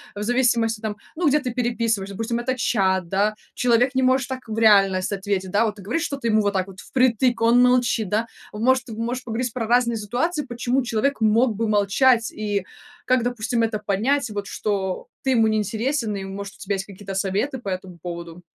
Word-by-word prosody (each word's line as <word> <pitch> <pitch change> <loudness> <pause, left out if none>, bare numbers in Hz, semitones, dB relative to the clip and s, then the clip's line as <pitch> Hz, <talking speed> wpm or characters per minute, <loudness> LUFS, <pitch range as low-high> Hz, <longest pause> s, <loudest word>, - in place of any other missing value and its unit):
в 205 - -4
зависимости, 235 -2 +2
там, 215 -1 -4 0.2
ну 340 -1 +1
где 300 +2 +4
ты 250 -4 -4
переписываешься, 230 -5 -1
допустим 230 +2 -2
это 255 +2 -1
чат, 190 -6 +1
да, 205 +2 +1 0.2
человек 250 +2 +2
не 260 - +1
может 260 +1 +2
так 260 -2 -6
в 220 0 -5
реальность 195 -4 +4
ответить, 195 -1 -2
да, 210 +4 +3
вот 210 -2 -2
ты 200 - -12
говоришь 255 - -1
что 280 -4 -3
ты 235 -4 -2
ему 215 0 +4
вот 205 0 0
так 190 -1 0
вот 190 0 -12
впритык, 250 -1 +1
он 235 +2 +5
молчит, 245 -5 +2
да, 220 +2 +1 0.3
он 210 +1 -6
может 255 0 +2
можешь 235 +3 -3
поговорить 235 0 -3
про 230 -3 -3
разные 235 0 +2
ситуации. 265 - -1
Почему 245 +1 -1
человек 245 +2 -1
мог 220 +2 +3
бы 225 +2 -1
молчать 220 +3 +3
и 205 -3 -2 0.4
как, 255 -2 +2
допустим, 240 -1 -1
это 220 -2 -1
понять, 225 +7 0
вот 205 -1 -4
что 190 -3 -2 0.2
ты 270 - 0
ему 225 -3 +4
не 215 0 +1
интересен 225 +2 -1
и 195 - -5
может 195 +1 -7
у - - -20
тебя 200 0 -2
есть 195 - -3
какие-то 195 0 -9
советы 200 +8 -1
по 235 -5 -6
этому 185 -1 -5
поводу? 170 0 -7
225 Hz, 210 wpm, -23 LUFS, 200-245 Hz, 0.4 s, он